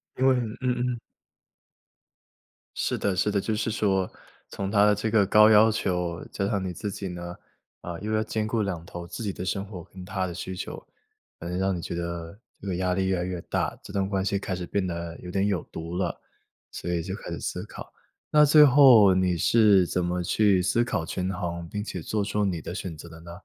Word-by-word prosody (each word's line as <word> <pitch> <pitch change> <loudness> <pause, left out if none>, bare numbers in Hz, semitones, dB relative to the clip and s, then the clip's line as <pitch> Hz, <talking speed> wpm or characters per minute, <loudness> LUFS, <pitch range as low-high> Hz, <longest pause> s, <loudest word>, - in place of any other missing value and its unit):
因 130 - +1
为， 130 - +5
嗯 115 -3 -2
嗯。 125 -1 -1 1.8
是 - - 0
的 100 -2 -1
是 105 +3 +1
的， 100 -1 +1
就 110 +1 -1
是 110 +1 -1
说 95 -4 +1 0.4
从 100 -1 -4
她 105 0 +4
的 105 - +5
这 110 +2 -2
个 105 -2 +4
高 105 +2 +6
要 110 +1 +6
求 90 -5 -2
加 100 - -2
上 100 -3 -1
你 90 - -3
自 100 +3 -5
己 95 0 -5
呢， 85 0 -6 0.5
呃， 85 -1 -6
又 110 +1 -3
要 110 0 +2
兼 110 0 -2
顾 110 0 0
2 90 -5 -3
头 85 0 -8
自 115 +5 -6
己 100 -3 -2
的 90 - -6
生 95 +2 -2
活 95 -4 -9
跟 95 -1 -11
她 95 -1 -2
的 85 - -6
需 95 +1 -5
求， - - -7 0.6
有 85 - -5
些 90 - -2
让 95 0 +1
你 85 - -5
觉 85 - -5
得 85 +2 -5 0.2
这 100 - -7
个 95 - -1
压 90 0 0
力 95 0 0
越 95 -1 +1
来 90 - -1
越 90 -2 -4
大， - - -1
这 - - -11
段 100 -1 0
关 95 -1 -1
系 100 0 0
开 95 -1 -3
始 90 - -5
变 100 -2 -1
得 85 -1 -5
有 90 - -7
点 100 +1 +1
有 100 -3 0
毒 85 +2 -5
了， 95 - -2 0.5
所 90 - -5
以 85 - 0
就 95 +3 -5
开 - - -8
始 - - -4
思 - - -4
考。 - - -10 0.4
那 150 0 +6
最 150 +1 +8
后 125 -9 +7
你 90 -1 +2
是 100 -1 +4
怎 90 -1 -1
么 90 0 -1
去 100 +1 +3
思 115 +5 +2
考 90 -8 -2
权 90 +3 -3
衡， 85 -2 -4
并 105 +4 -4
且 95 -3 -5
做 105 +5 -2
出 105 +1 -1
了 - - +2
你 85 -4 -2
的 90 - -6
选 90 -5 -5
择 80 +2 -11
的 80 0 -12
呢？ 85 0 -10
95 Hz, 250 characters per minute, -26 LUFS, 90-105 Hz, 1.8 s, 最